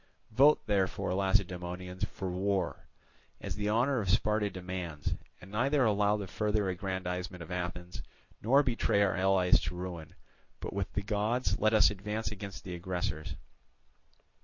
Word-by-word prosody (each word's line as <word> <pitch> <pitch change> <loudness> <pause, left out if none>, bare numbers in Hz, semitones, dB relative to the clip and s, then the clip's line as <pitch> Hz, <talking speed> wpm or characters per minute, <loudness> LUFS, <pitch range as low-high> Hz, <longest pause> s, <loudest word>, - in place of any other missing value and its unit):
Vote 140 +7 +5
therefore, 95 -3 0
Lacedaemonians, 90 -2 -1
for 95 -2 -5
war, 95 -1 -1 0.5
as - - -5
the 105 0 -1
honour 125 +5 +2
of 95 - -3
Sparta 105 +1 +2
demands, 90 -5 -4 0.3
and 95 - -13
neither 135 +5 +2
allow 105 -1 +3
the 100 - -4
further 105 +1 0
aggrandizement 90 -1 -3
of 85 - -11
Athens, 90 0 -4 0.4
nor 135 +6 +5
betray 115 -5 +2
our 95 -4 +1
allies 95 -1 +4
to 90 - -4
ruin, 90 -3 -6 0.4
but - - -5
with 100 -1 -2
the 100 - -1
gods 110 +4 0
let 110 +1 +3
us 105 -1 +6
advance 105 +3 -3
against 100 -3 -7
the 90 - -6
aggressors." 85 -3 -3
95 Hz, 145 wpm, -31 LUFS, 90-105 Hz, 0.5 s, us